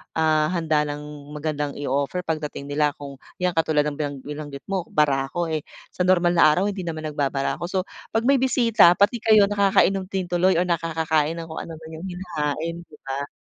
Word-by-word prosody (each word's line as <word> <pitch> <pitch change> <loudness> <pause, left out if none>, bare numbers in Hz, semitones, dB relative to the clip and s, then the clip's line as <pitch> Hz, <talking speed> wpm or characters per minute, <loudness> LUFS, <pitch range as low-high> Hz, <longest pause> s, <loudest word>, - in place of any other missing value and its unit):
ah, 155 -1 +3
handa 155 -3 0
ng 145 0 -7
magandang 150 -1 -3
i-o-offer 140 +5 -2
pagdating 150 -3 -4
nila 150 0 +1
kung 140 -2 -10 0.2
yang 180 0 0
katulad 160 -3 +2
ng 150 0 -4
binang 145 -2 -2
binanggit 145 -2 -7
mo, 185 -4 -1
barako, 140 +2 +1
eh, 155 - 0 0.3
sa 180 - -1
normal 175 -2 +4
na 160 - +8
araw, 185 - +1
hindi 190 -3 -6
naman 160 -1 -4
nagbabarako. 145 +2 -2
So, 185 0 -1 0.3
'pag 225 - +2
may 275 +2 +4
bisita 230 -8 +5
pati 205 +5 +2
kayo 215 -1 +5
nakakainom 195 -1 +3
din 190 -1 -2
tuloy 180 +1 +3
o 170 - +3
nakakakain 165 -2 0
ng 165 -1 -6
kung - - -5
ano 165 - -7
man 160 0 -11
yung 180 - -7
hinahain, 170 -3 -3
di 150 - -16
ba? 140 +1 -4
160 Hz, 190 wpm, -23 LUFS, 150-180 Hz, 0.3 s, na